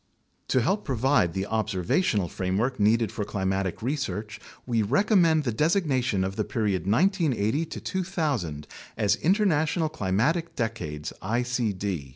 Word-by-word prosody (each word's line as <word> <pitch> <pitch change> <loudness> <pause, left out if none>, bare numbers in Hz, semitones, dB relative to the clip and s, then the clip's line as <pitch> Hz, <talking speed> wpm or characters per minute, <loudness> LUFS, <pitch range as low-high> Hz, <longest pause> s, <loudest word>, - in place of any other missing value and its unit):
To 130 - +2
help 195 - 0
provide 130 - +2
the 95 +2 -2
observational 105 - 0
framework 100 +9 -1
needed 110 +1 +3
for 105 - -3
climatic 95 -1 -2
research, 105 -6 -3 0.3
we 115 -3 +1
recommend 165 - +3
the 125 - -1
designation 130 - +1
of 95 +1 -3
the 105 - +1
period 100 -5 -1
1980 155 - +2
2000 150 - -2 0.3
as 105 -2 +2
International 165 -4 +2
Climatic 130 - 0
Decades 90 - -4
(icd). 115 -2 -1
115 Hz, 120 wpm, -26 LUFS, 100-155 Hz, 0.3 s, needed